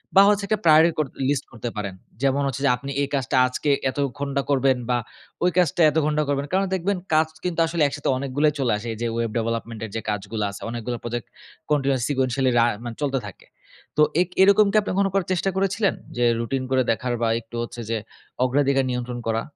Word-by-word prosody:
বা 195 - +9
হচ্ছে 205 0 +2
একটা 215 0 0
priority 160 +1 +7
কর 155 - +2 0.2
লিস্ট 145 -1 0
করতে 120 0 -5
পারেন। 100 -2 -3 0.3
যেমন 140 +1 +2
হচ্ছে 135 0 -4
যে - - +5
আপনি 140 +2 -7
এই 140 - 0
কাজটা 135 -3 -1
আজকে 130 +3 -2 0.2
এত 130 - -7 0.2
ঘন্টা 140 -1 -1
করবেন 135 -2 +3
বা 125 - +3 0.5
ওই 180 - +5
কাজটা 175 -1 +2
এত 155 - -2
ঘন্টা 150 0 +1
করবেন। 140 0 0
কারণ, 190 +1 +2
দেখবেন 190 +2 -1 0.2
কাজ 155 +1 +4 0.2
কিন্তু 175 -2 -2
আসলে 165 0 -2
একসাথে 145 +1 -3
অনেকগুলাই 140 +3 +1
চলে 130 -3 +1
আসে। 110 +3 -7
এইযে 115 +2 -3
ওয়েব 115 -1 -1
ডেভেলপমেন্টের 115 -1 -3
যে 110 - -2
কাজগুলা 105 +1 -2
আছে। 100 - -10
অনেকগুলো 120 +1 -4
প্রজেক্ট 120 0 -4 0.4
continuous 135 -3 +1
sequentially 130 -1 +1
রা 115 - +5 0.2
মানে 120 -2 -6
চলতে 135 -2 0
থাকে। 100 - -12 0.5
তো - - +5 0.2
এক 180 - 0
এরকম 200 +2 +6
কি - - -4
আপনি 205 - -4
কখনো 195 0 +2
করার 195 -2 0
চেষ্টা 185 +2 0
করেছিলেন? 195 +1 +1 0.2
যে 120 - +2
রুটিন 130 +3 -2
করে 130 0 +3
দেখার 125 +2 -1
বা 115 - +2
একটু 115 +1 -13
হচ্ছে 120 0 -7
যে 115 - 0 0.5
অগ্রাধিকার 135 +1 +2
নিয়ন্ত্রণ 125 0 -3
করা? 115 0 +1
135 Hz, 205 wpm, -23 LUFS, 120-155 Hz, 0.5 s, বা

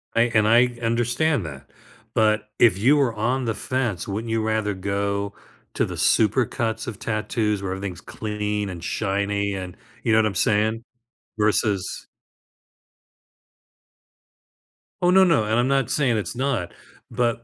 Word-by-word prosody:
I 115 - +4
and 110 -1 +4
I 120 +2 +4
understand 120 - +1
that. 70 -2 -9 0.4
But 110 -1 +2
if 110 -6 +5
you 130 +9 +4
were 130 -5 +2
on 120 +4 -1
the 115 - -1
fence, 120 -9 -2
wouldn't 110 +3 -4
you 115 -1 +1
rather 110 -1 0
go 100 +1 -2 0.4
to - - +1
the - - -6
supercuts 110 0 +1
of 110 -3 -6
tattoos 105 -2 -1
where 95 - -3
everything's 95 -2 -6
clean 105 -1 -3
and 85 -3 -7
shiny 100 0 -1
and 95 -2 -6 0.3
you - - +1
know 110 - +5
what 110 - +3
I'm 100 - -4
saying? 110 +2 +1 0.6
Versus 105 -2 0 3.0
Oh, 180 - +3
no, 190 +1 +7
no. 165 -11 +3
And 110 - 0
I'm 125 - +2
not 135 -3 +1
saying 130 -6 +2
it's 90 -6 -4
not, 125 -8 -1 0.4
but 120 -1 0
110 Hz, 150 wpm, -23 LUFS, 100-120 Hz, 3.0 s, no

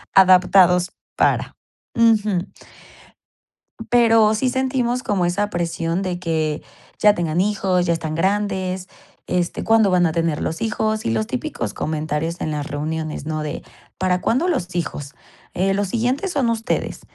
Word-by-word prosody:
adaptados 180 -1 +5 0.3
para - - +1 0.4
Ujú. 215 -5 +2 1.4
Pero 225 -3 +5
sí 250 +4 0
sentimos 255 -1 0
como 190 -5 0
esa 205 +4 -1
presión 170 0 -2
de 180 -2 -3
que: 160 -3 -1 0.4
"Ya 210 -1 +5
tengan 170 -2 -1
hijos, 190 -3 +1
ya 170 - +2
están 160 -2 -3
grandes, 190 0 -1 0.4
este, 180 -1 -1
cuándo 225 -3 +4
van 180 -1 +3
a 160 - 0
tener 165 -2 -1
los 160 - -3
hijos", 220 -1 -1
y 115 - 0
los 110 -1 0
típicos 120 -4 -4
comentarios 155 +2 -3
en - - -2
las 145 -1 -3
reuniones, 155 0 -4
¿no? 155 -1 -2
De, 150 - -5 0.4
¿para 180 -1 +1
cuándo 270 - +1
los 185 - -2
hijos? 145 -4 -4 0.4
Eh, 195 +2 +1
los 200 -1 -1
siguientes 250 - -1
son 265 -7 +1
ustedes, 225 +1 -2
185 Hz, 145 wpm, -21 LUFS, 165-215 Hz, 1.4 s, adaptados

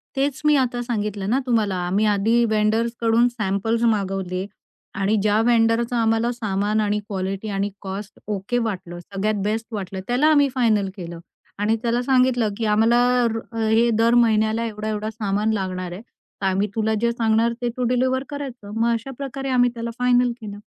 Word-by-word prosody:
तेच 275 0 -1
मी 300 0 +5
आता 245 -1 -1
सांगितलं 210 -4 -3
ना 255 +4 +2
तुम्हाला, 220 -6 +1
आम्ही 200 +4 +1
आधी 215 +3 +3
वेन्डर्सकडून 230 +2 +2
सॅम्पल्स 225 0 -1
मागवले 190 -3 -2 0.5
आणि 200 +2 +2
ज्या 210 +1 +2
वेन्डरचं 230 +1 +2
आम्हाला 225 0 +2
सामान, 210 -2 -1
आणि 210 0 0
क्वालिटी, 195 +1 -3
आणि 200 0 -1
काॅस्ट 195 +1 -7
ओके 210 +3 -2
वाटलं, 180 -5 -5
सगळ्यात 200 +4 -2
बेस्ट 220 +2 -2
वाटलं. 195 -2 -4
त्याला 250 +5 +2
आम्ही 290 -2 +5
फायनल 215 -6 +2
केलं 170 -3 -7 0.4
आणि 210 +2 +2
त्याला 240 +1 +1
सांगितलं, 255 -3 +3
की 225 - -2
आम्हाला 225 +3 +3 0.5
हे 225 +1 +3
दर 230 +1 +4
महिन्याला 220 0 +1
एवढा-एवढा 215 -1 -3
सामान 215 0 -1
लागणार 185 -3 -3
आहे. 180 +4 -7 0.4
तर - - -1
आम्ही 195 +2 +1
तुला 220 0 +1
जे 235 0 +2
सांगणार, 230 0 +1
ते 240 - 0
तू 250 - -1
डिलिव्हर 260 +1 +1
करायचं. 265 -8 -7
मग 230 +1 +2
अशा 230 +4 -4
प्रकारे 270 -1 -5
आम्ही 245 -1 +3
त्याला 235 0 -4
फायनल 250 0 +3
केलं. 205 -2 -7
220 Hz, 165 wpm, -22 LUFS, 205-240 Hz, 0.5 s, मी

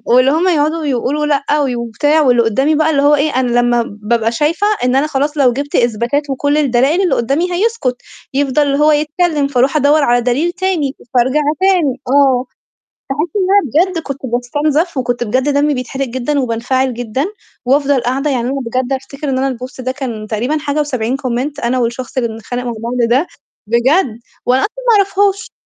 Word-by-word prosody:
واللي 255 +2 +5
هُم 330 +4 +1
يقعدوا 315 -1 +1
يقولوا 280 +3 -1
لأ 290 0 +1
وي 265 -3 -1
وبتاع، 240 +7 +1
واللي 245 -4 +4
قُدّامي 265 +8 +1
بقى 315 +1 +2
اللي 280 -3 +2
هو 290 +1 +5
إيه 295 +2 +1
أنا 245 -2 +1
لمّا 240 -1 +2 0.2
بابقى 225 +1 0
شايفة 315 - 0 0.2
إن 250 +1 +2
أنا 280 +3 +2
خلاص 295 +1 -1
لو 255 -4 +4
جِبت 285 +2 -4
إثباتات 240 +5 0
وكل 285 +2 0
الدلائل، 280 +4 +2
اللي 370 - +2
قُدّامي 280 +10 0
هيسكُت، 360 - -1 0.3
يفضل 280 +1 +1
اللي 280 -1 0
هو 305 +1 +5
يتكلّم، 300 0 +1
فأروح 270 +1 +1
أدوّر 290 +1 +3
على 245 -2 +3
دليل 260 +8 0
تاني، 350 -7 -1 0.2
فأرجع 260 +4 +2 0.2
تاني 360 -9 +2
آه. 265 -1 +3 0.6
باحس 300 +5 -1
إن 385 -3 +1
أنا 370 - +3
بجد 330 - -3
كنت 275 -1 -6
باستُنزف 290 +7 -1
وكنت 245 -1 -1
بجد 255 +6 0
دمي 290 +1 +2
بيتحرق 265 +1 -3
جدًا، 260 +4 -2
وبانفعل 255 +1 -1
جدًا، 245 +4 -3 0.4
وأفضل 275 0 +2
قاعدة 270 +4 -1
يعني 245 -1 -1
أنا 275 +1 -2
بجد 255 +3 -1
أفتكر 275 +2 -5
إن 260 - 0
أنا 265 -1 -1
الpost 255 +1 -8
ده 255 - -1
كان 240 -6 -6
تقريبًا 240 +8 -1
حاجة 300 0 -2
و70 255 -4 -1
comment 270 +2 -3
أنا 255 +2 +1
والشخص 240 +2 -3
اللي 235 -3 +1
بنتخانق 225 +3 -5
مع 240 -1 -3
بعض 240 +2 -3
ده 270 +8 +2 0.4
بجد، 235 - +1 0.3
وأنا 255 +2 +2
أصلًا 425 - -2
ما 455 - +5
أعرفهاش 400 0 +1
275 Hz, 185 wpm, -15 LUFS, 245-300 Hz, 0.6 s, واللي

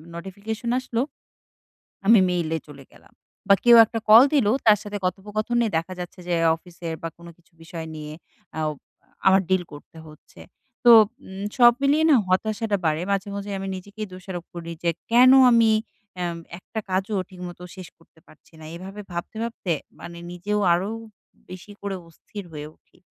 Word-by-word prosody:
Notification 200 +6 -6
আসলো। 245 -2 -2 1.0
আমি 220 +1 +7
মেইলে 165 -3 -1
চলে 140 -2 -12
গেলাম। - - -21 0.3
বা 200 - +7
কেউ 240 -1 +8
একটা 225 +1 -4
কল 225 +3 +10
দিলো 240 -8 +3
তার 215 -2 +7
সাথে 205 0 -5
কথোপকথনে 210 +6 -1
দেখা 165 +3 -4
যাচ্ছে 180 +1 -8
যে 175 - +1 0.2
অফিসের 170 -1 -8
বা 165 - -3
কোন 170 0 -13
কিছু 170 - -31
বিষয় 165 0 -7
নিয়ে 150 0 -7 0.5
আও 155 -1 0 0.6
আমার 190 0 +6
ডিল 185 -1 +2
করতে 145 +2 -13
হচ্ছে। 155 0 -16 0.4
তো 240 - +9 0.3
উম 190 +1 -8
সব 240 -1 +7
মিলিয়ে 295 +3 +3
না - - +7
হতাশাটা 215 +3 0
বাড়ে। 155 0 +1
মাঝে, 200 +1 -1
মাঝে 200 0 -6
আমি 195 0 -5
নিজেকেই 205 +3 -8
দোষারোপ 185 -1 -8
করি, 170 -1 -7
যে 170 - +2 0.2
কেন 250 +2 +7 0.2
আমি 230 -2 +5 0.5
এম 170 -1 -3 0.2
একটা 220 +4 -7
কাজও 195 +3 -1
ঠিকমতো 180 -1 -9
শেষ 185 -2 -9
করতে 165 0 -26
পারছি 155 - -22
না। 155 - -11
এভাবে 195 +4 -9
ভাবতে, 175 +5 -6
ভাবতে 225 -6 -3 0.3
মানে 170 0 -9
নিজেও 205 +4 -2
আরো 185 +4 -1 0.6
বেশি 185 +3 -10
করে 200 -1 -3
অস্থির 195 +5 -10
হয়ে 150 0 -6
উঠি। - - -32
190 Hz, 165 wpm, -24 LUFS, 170-215 Hz, 1.0 s, কল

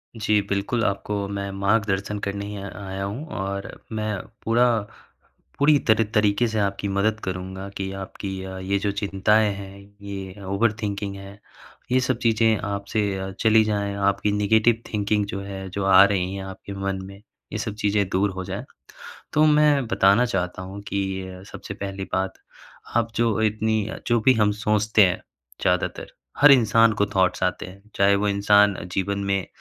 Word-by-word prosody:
जी, 105 -1 +2
बिल्कुल 100 +4 0
आपको 100 0 -2
मैं 100 0 -4
मार्गदर्शन 100 0 0
करने 100 0 -3
ही 105 0 -6
य 100 0 -6
आया 95 0 -5
हूँ। 105 +10 -4
और 100 0 -4 0.2
मैं 110 -1 -2 0.3
पूरा 120 +2 +3 0.9
पूरी 145 +1 +5
तरह 110 0 +5
तरीके 105 +3 +3
से 110 -1 -2
आपकी 100 0 -1
मदद 100 +2 0
करूँगा 95 +1 -5
कि 95 0 -3
आपकी 95 0 -6
अ, 95 0 -7
ये 95 +1 0
जो 100 0 -1
चिंताएँ 100 +1 +2
हैं, 100 0 -9 0.2
ये 100 0 -7
ओवरथिंकिंग 100 0 -1
है 100 +1 -11 0.5
ये 130 - +4
सब 130 -2 0
चीज़ें 115 -2 +3
आप 100 0 -3
से 110 - +2 0.2
अ, 95 0 -4
चली 110 -1 +5
जाएँ। 100 -2 -1
आपकी 100 +1 +1
नेगेटिव 110 +3 +3
थिंकिंग 105 0 +1
जो 100 -1 -5
है, 95 -1 -7
जो 95 +1 -3
आ 95 0 +8
रही 95 -2 0
हैं 95 - -5
आपके 95 +1 -8
मन 95 -1 -3
में 100 +1 -12 0.3
ये - - -1
सब 105 -1 -4
चीज़ें 100 -1 +2
दूर 100 +2 +1
हो 95 0 -5
जाएँ। 95 +1 -5 0.7
तो 155 - +4
मैं 150 -3 +4
बताना 100 +1 +4
चाहता 90 -3 -2
हूँ 95 +2 -8
कि 95 -1 -4
सबसे 100 - -7
पहली 95 -1 -5
बात 95 0 -1 0.6
आप 115 -1 +1
जो 115 -2 +1
इतनी 110 0 +1
अ, - - -6
जो 120 -1 +2
भी 130 +4 +5
हम 105 -2 +3
सोचते 105 -1 +4
हैं 90 - -2 0.4
ज़्यादातर - - -1 0.3
हर 145 - +8
इंसान 115 -2 +5
को 100 - +2
थॉट्स 95 0 +2
आते 90 - -1
हैं। 95 +2 -13
चाहे 100 0 +4
वो 105 +1 0
इंसान 100 0 +4 0.2
जीवन 100 +1 -1
में 100 -2 0
100 Hz, 175 wpm, -24 LUFS, 95-110 Hz, 0.9 s, आ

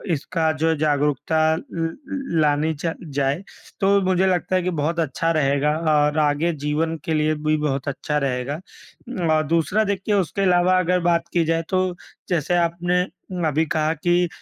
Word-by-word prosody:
इसका 160 +2 -1
जो 165 - +3
है 160 - +1
जागरूकता 150 +1 +1 0.2
ल - - -5
ल 265 - -3
लानी 150 +1 +2
चा 160 +2 -3 0.2
जाए, 140 +3 0 0.4
तो 200 +1 +3
मुझे 185 0 +2
लगता 185 0 0
है 185 - +2
कि 180 - 0
बहुत 165 +4 -1
अच्छा 165 +1 0
रहेगा 145 -1 +2 0.2
और 150 0 +2
आगे 150 +3 +2
जीवन 160 +2 0
के 160 - -1
लिए 155 0 +1
भी 155 +1 0
बहुत 140 -3 -2
अच्छा 150 +2 -2
रहेगा। 135 +1 -2 0.8
और 155 - +2
दूसरा 170 +7 +2
देखिए 200 0 -1
उसके 195 0 0
अलावा 180 -1 +4
अगर 180 0 +1
बात 170 0 +1
की 170 - +3
जाए, 165 +1 +1
तो 185 -1 0 0.3
जैसे 175 0 +1
आपने 175 +1 +1 0.5
अभी 155 +2 +1
कहा 155 0 0
कि 175 +2 +1
160 Hz, 170 wpm, -22 LUFS, 150-180 Hz, 0.8 s, अलावा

